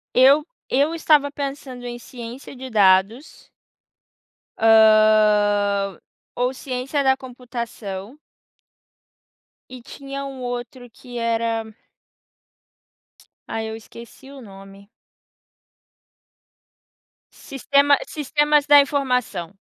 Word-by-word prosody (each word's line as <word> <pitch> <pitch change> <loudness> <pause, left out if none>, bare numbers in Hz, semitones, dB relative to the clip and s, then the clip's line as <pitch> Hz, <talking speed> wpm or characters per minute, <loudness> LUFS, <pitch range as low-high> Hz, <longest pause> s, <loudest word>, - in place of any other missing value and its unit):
Eu 275 +4 +5 0.2
eu 285 +5 +1
estava 300 -3 +2
pensando 275 -3 -7
em 240 0 -6
ciência 240 +2 -10
de 260 +1 -8
dados. 205 +5 +1 1.1
Hã, 210 -3 +4 0.4
ou 250 +1 0
ciência 265 +2 -3
da 265 -1 +3
computação. 235 -3 -8 1.5
E 255 0 -10
tinha 275 +2 -8
um 270 -2 -8
outro 245 0 -6
que 245 +1 -10
era 230 -1 -1 1.8
ai, 220 0 -4
eu 220 - -6
esqueci 235 +4 -14
o 280 -1 -12
nome. 195 -2 -14 2.4
Sistema 280 +1 +1
sistemas 295 0 +1
da 290 0 +7
informação. 250 - -1
245 Hz, 85 wpm, -21 LUFS, 220-275 Hz, 2.4 s, da